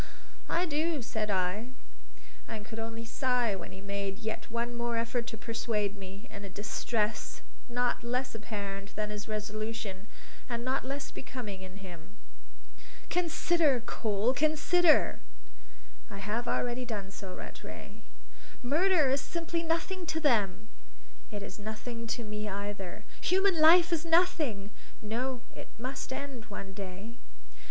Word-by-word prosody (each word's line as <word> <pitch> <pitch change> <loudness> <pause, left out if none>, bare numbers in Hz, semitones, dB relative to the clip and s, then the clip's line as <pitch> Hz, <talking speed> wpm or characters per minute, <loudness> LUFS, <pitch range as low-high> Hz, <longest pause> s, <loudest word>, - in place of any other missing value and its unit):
"I 350 - +3
do," 310 -2 +1
said 215 -1 -1
I, 190 +4 +1 0.8
and 215 -2 -5
could 225 0 -6
only 225 +1 -4
sigh 245 -3 +2
when 185 - -6
he 190 - -9
made 200 -1 -2
yet 220 0 -4
one 235 +1 -1
more 235 -1 0
effort 235 +1 0
to 225 - -4
persuade 215 -2 0
me, 195 +3 -8
in 200 - -7
a 200 - -5
distress 215 +2 -1 0.3
not 245 0 +1
less 250 +2 0
apparent 200 -3 -4
than 210 0 -1
his 210 -1 -4
resolution, 215 -2 -3 0.4
and 235 0 -2
not 260 +1 +1
less 275 +2 -3
becoming 215 -8 -5
in 190 +1 -8
him. 170 -3 -10 1.0
"Consider, 335 -4 +4
Cole, 220 +2 +2
consider!" 310 +3 +5 0.9
"I 200 - -7
have 210 +4 -1
already 245 +1 +1
done 205 -5 -3
so, 190 -2 -6
Rattray." - - -8 0.6
"Murder 315 +4 +5
is 275 +1 +3
simply 335 -1 -1
nothing 335 +2 0
to 320 - +1
them!" 215 - +3 0.6
"It 205 -2 -4
is 200 +1 -7
nothing 230 +2 -4
to 235 - -1
me 210 0 -3
either." 200 -2 -4 0.2
"Human 375 -1 +4
life 340 +2 +9
is 325 -1 +2
nothing!" 320 - +3 0.3
"No; 245 +4 -1
it - - -7
must 255 +3 -3
end 260 -4 -4
one 195 -1 -6
day." 200 +4 -6
230 Hz, 140 wpm, -32 LUFS, 205-270 Hz, 1.0 s, life